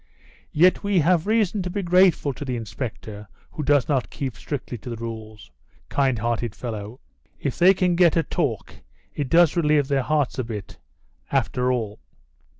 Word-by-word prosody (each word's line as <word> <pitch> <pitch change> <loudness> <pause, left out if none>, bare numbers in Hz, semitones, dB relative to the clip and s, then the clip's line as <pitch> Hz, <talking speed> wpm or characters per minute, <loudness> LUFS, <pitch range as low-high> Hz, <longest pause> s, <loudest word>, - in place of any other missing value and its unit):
"Yet 180 +4 +4
we 200 -1 +1
have 170 +2 +2
reason 215 -2 +1
to 180 - -3
be 200 +2 -3
grateful 180 -5 +3
to 135 - -7
the 130 -3 -3
inspector 105 -2 -6 0.2
who - - -5
does 145 -3 +2
not 135 -4 0
keep 130 -5 -5
strictly 135 -1 -5
to 110 - -9
the 115 - -4
rules, 110 - -8 0.4
kind 135 -3 +1
hearted 120 0 -2
fellow. 110 0 -6 0.4
If 140 - -3
they 185 +2 +6
can 180 -1 +1
get 170 -2 +4
a 165 - +3
talk 140 - -2 0.4
it 145 -3 -3
does 170 -1 +5
relieve 150 -4 +2
their 140 -1 +2
hearts 145 -1 0
a - - 0
bit, 110 -4 -7 0.5
after 125 -1 +1
all!" 110 -4 -3
135 Hz, 170 wpm, -23 LUFS, 115-170 Hz, 0.5 s, they